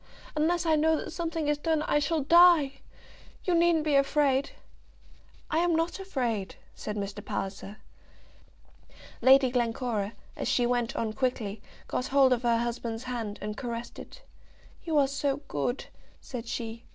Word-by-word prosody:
Unless 335 +3 +1
I 320 -1 +4
know 320 +1 +3
that - - -5
something 330 -2 -3
is 295 0 +1
done, 315 0 0
I 295 - +2
shall 310 0 0
die. 325 -4 +6 0.6
You 360 - 0
needn't 340 -2 +3
be 305 -1 0
afraid." 275 -1 +2 1.0
"I'm 335 +1 +2
not 330 +4 -1
afraid," 245 - -2 0.2
said 210 - -6
Mr. 200 -1 -5
Palliser. 195 +1 -5 1.4
Lady 265 -1 +6
Glencora, 230 -3 -1 0.2
as - - -4
she 245 - +2
went 240 -1 0
on 220 -1 -2
quickly, 220 -5 -2 0.3
got 250 - -2
hold 270 -2 +5
of 240 - -1
her 235 -2 +2
husband's 235 0 -3
hand, 230 -5 -4
and 210 0 -4
caressed 235 0 -6
it. - - -12 0.6
"You 320 -3 0
are 280 -2 +5
so 275 +1 -1
good," 150 - -2 0.3
said 240 -3 -7
she. 230 0 -5
265 Hz, 150 wpm, -28 LUFS, 230-310 Hz, 1.4 s, die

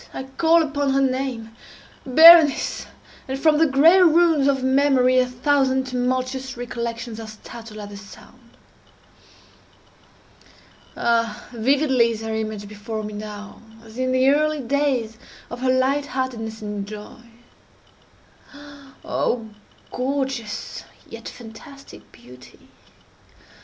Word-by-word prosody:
—I - - -5
call 325 +5 +2
upon 285 -2 -1
her 275 - +2
name—Berenice!—and 265 +4 +2
from 305 0 +3
the 325 - +4
gray 310 +7 +5
ruins 330 -4 +4
of 270 -2 +1
memory 260 -1 +3
a 250 - +2
thousand 265 +1 +1
tumultuous 255 0 -3
recollections 235 -1 -5
are 225 - -8
startled 215 +1 -11
at 205 -1 -8
the 205 - -10
sound! 235 +4 -16 2.4
Ah, 230 -2 -1
vividly 260 0 +2
is 225 -1 -5
her 225 0 -4
image 215 -2 -4
before 215 +1 -6
me 210 0 -7
now, 210 0 -9 0.2
as 225 +2 -12
in 255 0 0
the 255 +1 +2
early 305 +1 +1
days 255 -4 -1 0.3
of 240 - -6
her 255 0 -1
light 270 +3 +1
heartedness 225 -5 -4
and 205 -1 -5
joy! 210 +2 -10 1.8
Oh, 230 -3 -2 0.4
gorgeous 260 -4 -4 0.2
yet - - -9
fantastic 275 +5 -14
beauty! 125 +1 -17
255 Hz, 110 wpm, -22 LUFS, 225-275 Hz, 2.4 s, gray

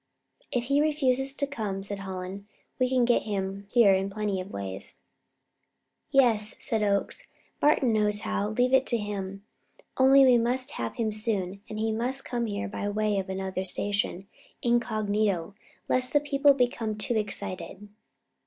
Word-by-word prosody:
"If 245 -4 0
he 280 +4 +2
refuses 275 -3 +1
to 285 - 0
come," 210 -8 -4
said 200 0 -5
Hallen, 190 +1 -6 0.3
"we 255 0 +2
can 255 -2 +3
get 240 0 +3
him 195 -1 -4
here 215 -4 +5
in 190 +1 0
plenty 205 -2 -2
of 185 - -9
ways." 100 - -6 1.1
"Yes," 225 -6 +3
said 220 -2 -1
Oakes, 205 - -1 0.3
"Martin 275 -5 +3
knows 210 -1 +2
how; 210 -2 -1
leave 245 +4 +1
it 265 0 +4
to 235 - +2
him. 200 -2 -5 0.5
Only, 270 +1 +7
we 250 -2 +6
must 250 +2 -1
have 115 -1 -4
him 220 -2 -1
soon, 200 -3 -1
and 215 - -6
he 220 +1 0
must 250 +5 -1
come 240 -2 -2
here 210 +1 -3
by 205 0 -4
way 210 -1 0
of 190 0 -5
another 190 0 -3
station, 200 0 -1 0.4
incognito, 215 -6 0 0.3
lest 255 0 +3
the 290 - +5
people 285 -1 +3
become 235 -4 -1
too 235 +3 0
excited." 205 -1 -4
215 Hz, 160 wpm, -27 LUFS, 200-250 Hz, 1.1 s, Only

